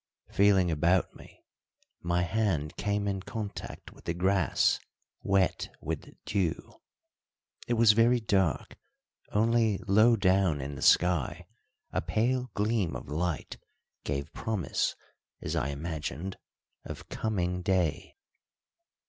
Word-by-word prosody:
Feeling 95 Hz, -3 st, +4 dB
about 85 Hz, +4 st, +2 dB
me, -, -, -16 dB, 0.6 s
my 85 Hz, +1 st, +1 dB
hand 90 Hz, -6 st, -1 dB
came 100 Hz, 0 st, -1 dB
in 95 Hz, -1 st, -1 dB
contact 105 Hz, +1 st, -7 dB
with -, -, -19 dB
the 85 Hz, -, -2 dB
grass 95 Hz, +2 st, +2 dB, 0.4 s
wet 95 Hz, -2 st, +1 dB
with 80 Hz, 0 st, -5 dB
dew. 95 Hz, -5 st, -1 dB, 0.9 s
It 120 Hz, -, +1 dB
was 115 Hz, -1 st, +7 dB
very 115 Hz, +3 st, +4 dB
dark, 95 Hz, -7 st, 0 dB, 0.5 s
only 110 Hz, -1 st, +2 dB
low 110 Hz, +4 st, +5 dB
down 95 Hz, -6 st, +2 dB
in 70 Hz, +1 st, -5 dB
the 70 Hz, -, -8 dB
sky 90 Hz, -6 st, +3 dB, 0.5 s
a -, -, 0 dB
pale 120 Hz, +9 st, 0 dB
gleam 105 Hz, -, 0 dB
of 65 Hz, -, -7 dB
light 80 Hz, +1 st, -2 dB, 0.5 s
gave 70 Hz, -1 st, -3 dB
promise, 110 Hz, -6 st, -1 dB, 0.4 s
as -, -, -3 dB
I 65 Hz, -, 0 dB
imagined, 80 Hz, +3 st, -5 dB, 0.4 s
of -, -, -8 dB
coming 90 Hz, -4 st, -1 dB
day. 90 Hz, -5 st, 0 dB
95 Hz, 115 wpm, -29 LUFS, 85-105 Hz, 0.9 s, was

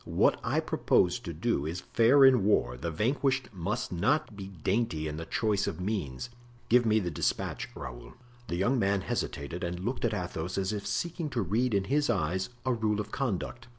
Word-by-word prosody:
What -, -, +2 dB
I -, -, +1 dB
propose 90 Hz, -1 st, +2 dB
to 85 Hz, -, -6 dB
do 80 Hz, -2 st, -1 dB
is 85 Hz, +3 st, -4 dB
fair 130 Hz, +5 st, +6 dB
in 130 Hz, -6 st, +6 dB
war; 60 Hz, -, +2 dB
the 70 Hz, +7 st, -4 dB
vanquished 130 Hz, -, 0 dB
must 100 Hz, +7 st, -3 dB
not 130 Hz, -, +1 dB
be 100 Hz, -1 st, -7 dB
dainty 95 Hz, -2 st, -1 dB
in 75 Hz, 0 st, -4 dB
the 80 Hz, -, -6 dB
choice 105 Hz, -3 st, +1 dB
of 80 Hz, -, -3 dB
means. 95 Hz, -, -3 dB, 0.4 s
Give 120 Hz, 0 st, +5 dB
me 110 Hz, 0 st, +4 dB
the 90 Hz, -4 st, -2 dB
despatch, -, -, -2 dB
Raoul." -, -, -8 dB, 0.3 s
The 85 Hz, -, -2 dB
young 120 Hz, +9 st, +2 dB
man 100 Hz, -1 st, +2 dB
hesitated 85 Hz, +2 st, -3 dB
and 90 Hz, 0 st, -3 dB
looked 120 Hz, +7 st, -3 dB
at 110 Hz, -3 st, +1 dB
Athos 90 Hz, -2 st, -4 dB
as 95 Hz, +2 st, 0 dB
if 100 Hz, -1 st, -4 dB
seeking 170 Hz, -2 st, -2 dB
to 120 Hz, -6 st, -1 dB
read 110 Hz, +5 st, +1 dB
in 100 Hz, -, +2 dB
his 145 Hz, +8 st, +1 dB
eyes 95 Hz, +5 st, 0 dB, 0.2 s
a 130 Hz, -, +2 dB
rule 110 Hz, -2 st, 0 dB
of 105 Hz, -, -4 dB
conduct. 120 Hz, -1 st, -3 dB
100 Hz, 195 wpm, -29 LUFS, 85-120 Hz, 0.4 s, fair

